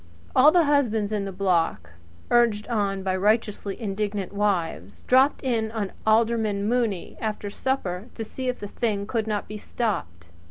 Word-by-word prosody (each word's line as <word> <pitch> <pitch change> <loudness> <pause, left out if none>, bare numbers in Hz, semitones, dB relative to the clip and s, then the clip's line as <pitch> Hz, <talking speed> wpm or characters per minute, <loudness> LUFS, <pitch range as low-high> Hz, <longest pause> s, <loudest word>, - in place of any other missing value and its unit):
All 275 +4 +8
the 350 0 +5
husbands 235 -8 +1
in 205 -2 -1
the 195 - -4
block, 170 - 0 0.4
urged 235 -3 +3
on 200 -4 0
by 190 -1 0
righteously 210 0 0
indignant 205 -2 -3
wives, 165 - -1
dropped 265 +4 +3
in 225 -4 0
on 205 -4 -2 0.2
Alderman 220 -2 +2
Mooney 230 -6 -1
after 210 -2 -3
supper 205 -6 -2
to 225 - -4
see 255 +4 -6
if 250 - -1
the 205 - -5
thing 205 -2 -2
could 220 0 -2
not 210 -1 -2
be 210 - -6
stopped. 90 - -3
210 Hz, 160 wpm, -25 LUFS, 195-230 Hz, 0.4 s, All